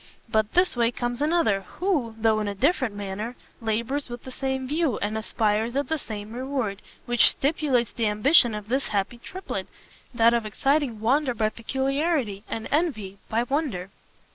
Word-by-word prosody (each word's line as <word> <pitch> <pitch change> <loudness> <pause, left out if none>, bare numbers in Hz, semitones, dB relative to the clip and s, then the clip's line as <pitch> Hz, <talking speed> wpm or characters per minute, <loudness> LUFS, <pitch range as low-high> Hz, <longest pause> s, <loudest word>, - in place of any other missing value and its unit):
But 220 -2 +1
this 360 -3 +3
way 235 -1 +3
comes 240 +1 -3
another, 300 - +2 0.2
who, 295 - 0
though 220 -1 +3
in 210 - -2
a 200 - -3
different 260 - +1
manner, 205 +4 -4 0.3
labours 235 +6 -1
with 240 0 -7
the 260 - -8
same 265 0 -2
view, 300 -3 +1
and 210 +1 -2
aspires 220 +1 0
at 280 -1 0
the 320 - 0
same 215 -3 -7
reward, 250 -5 -2 0.2
which 240 -1 +5
stimulate 275 -5 +1
the 230 -2 +1
ambition 235 +2 +5
of 210 -1 -6
this 265 +4 0
happy 205 +4 -1
Triplet, 375 +9 -5 0.4
that 235 -1 +4
of 235 -1 +2
exciting 270 0 0
wonder 255 +2 +2
by 215 -1 +1
peculiarity, 265 - -1
and 225 - -4
envy 220 - -1
by 230 +2 +1
wonder." 245 - -2
240 Hz, 165 wpm, -25 LUFS, 215-275 Hz, 0.4 s, which